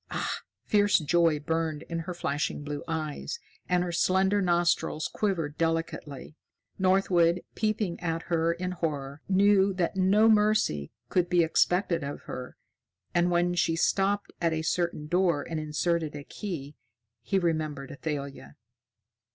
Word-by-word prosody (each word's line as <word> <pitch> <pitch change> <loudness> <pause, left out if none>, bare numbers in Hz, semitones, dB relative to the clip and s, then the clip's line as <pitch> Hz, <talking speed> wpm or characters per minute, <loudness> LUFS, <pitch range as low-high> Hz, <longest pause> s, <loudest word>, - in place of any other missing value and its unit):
Ah!" - - -2 0.3
Fierce 205 -1 +4
joy 165 -1 +2
burned 160 0 -2
in 165 0 -4
her 175 +2 -5
flashing 145 -2 -2
blue 145 0 -5
eyes, 160 - -3 0.3
and 180 -1 +3
her 180 - -3
slender 190 +3 +2
nostrils 175 -3 +1
quivered 165 -8 -2
delicately. 165 -3 -2 0.4
Northwood, 180 -2 +3
peeping 215 -5 -1
at 165 -1 -2
her 165 -1 +1
in 180 +2 -3
horror, 145 -5 -3
knew 195 0 +4
that 180 -1 -1
no 195 +4 +4
mercy 210 - +2 0.2
could 180 -1 +1
be 175 -1 +4
expected 170 +1 +2
of 140 +1 -5
her. 125 0 -8 0.6
And 175 +1 +3
when 175 0 +2
she 170 -2 +1
stopped 195 +4 +1
at 165 -1 +2
a 160 0 -2
certain 170 -2 -1
door 170 -2 +2
and 160 -1 -3
inserted 155 +1 -1
a 145 - -6
key, 150 -6 -6 0.5
he 195 - 0
remembered 155 -6 -1
Athalia. 140 - -5
170 Hz, 140 wpm, -28 LUFS, 155-185 Hz, 0.6 s, Fierce